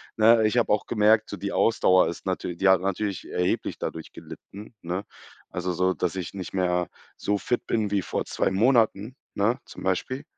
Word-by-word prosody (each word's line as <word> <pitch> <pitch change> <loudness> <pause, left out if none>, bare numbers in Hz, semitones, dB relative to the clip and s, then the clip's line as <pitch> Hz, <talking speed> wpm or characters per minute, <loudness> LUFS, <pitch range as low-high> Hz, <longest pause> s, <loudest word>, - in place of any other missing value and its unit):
ne, 110 0 +5
ich 110 - -1
habe 120 - +2
auch 105 - +1
gemerkt, 110 0 +3
so - - -4
die 100 +2 -4
Ausdauer 95 -5 +3
ist 85 - -6
natür 90 - -3
die 95 +2 +2
hat 95 - +5
natürlich 100 0 -3
erheblich 90 0 -1
dadurch 80 - -6
gelitten, 105 +4 -11
ne? 90 +4 -3 0.5
Also 90 0 -3
so, 95 +2 +1
dass 90 +1 -2
ich 90 -1 -5
nicht 95 -2 -7
mehr 90 -1 0 0.3
so 105 0 0
fit 120 - -2
bin 110 -3 0
wie 100 -1 +1
vor - - -3
2 - - 0
Monaten, 110 +2 +2 0.2
ne, 110 +5 +1
zum - - -11
Beispiel. 110 +9 -2
100 Hz, 190 wpm, -25 LUFS, 90-110 Hz, 0.5 s, ne